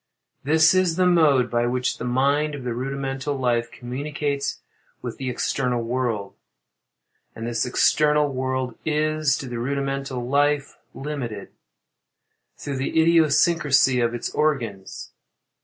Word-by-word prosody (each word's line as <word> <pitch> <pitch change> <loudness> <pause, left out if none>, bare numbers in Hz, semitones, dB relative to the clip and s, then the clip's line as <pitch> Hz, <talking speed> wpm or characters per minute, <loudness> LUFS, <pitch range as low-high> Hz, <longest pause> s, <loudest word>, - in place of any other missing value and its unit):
This 160 +4 +5
is 185 -3 +2
the 185 +1 +2
mode 150 -8 +4
by 120 0 +1
which 125 +1 -1
the 115 - -4
mind 140 +4 +1
of 140 - -8
the 125 -1 -2
rudimental 135 +2 -3
life 120 -2 0
communicates 140 +3 -3 0.5
with - - -5
the 130 -1 -3
external 125 -1 -1
world; 115 -4 -2 1.0
and 115 - -6
this 120 +1 -1
external 150 +3 +3
world 130 -1 -2
is, 155 -2 +1
to 135 - -6
the 120 -1 -5
rudimental 135 -1 -3
life, 145 +1 +1 0.2
limited, 130 -8 -5 1.1
through 140 -2 -5
the 135 +4 0
idiosyncrasy 160 -4 +4
of 120 0 0
its 120 - -4
organs. 115 -11 -2
135 Hz, 125 wpm, -23 LUFS, 125-150 Hz, 1.1 s, This